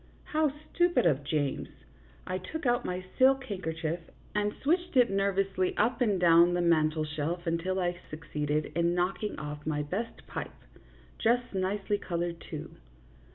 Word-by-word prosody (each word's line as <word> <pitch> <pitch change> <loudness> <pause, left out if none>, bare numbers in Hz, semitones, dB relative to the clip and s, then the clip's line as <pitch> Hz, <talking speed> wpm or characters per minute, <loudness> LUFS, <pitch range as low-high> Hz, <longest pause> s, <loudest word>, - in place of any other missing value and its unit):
How 305 -1 +1 0.2
stupid 345 - +3
of 145 -4 +3
James! 145 -1 -1 0.6
I 185 0 -2
took 315 - -6
out 240 -1 +2
my 180 +1 -3
silk 265 +1 +5
handkerchief 165 -6 -3 0.3
and 210 0 +1
switched 345 +1 +1
it 245 -4 +5
nervously 195 -1 +1
up 245 +4 +2
and 210 -6 +3
down 170 0 +6
the 175 - +1
mantel 155 -2 +3
shelf 155 +4 -3
until 170 +3 0
I 175 -1 0
suc 155 +1 -8
ceeded 150 0 -1
in 170 +1 +2
knocking 190 +4 -1
off 150 0 -6
my 150 -1 0
best 195 +10 -4
pipe - - -6 0.6
just 240 +1 +2
nicely 195 +2 0
colored, 170 -1 -3
too. - - -8
180 Hz, 155 wpm, -30 LUFS, 160-210 Hz, 0.6 s, down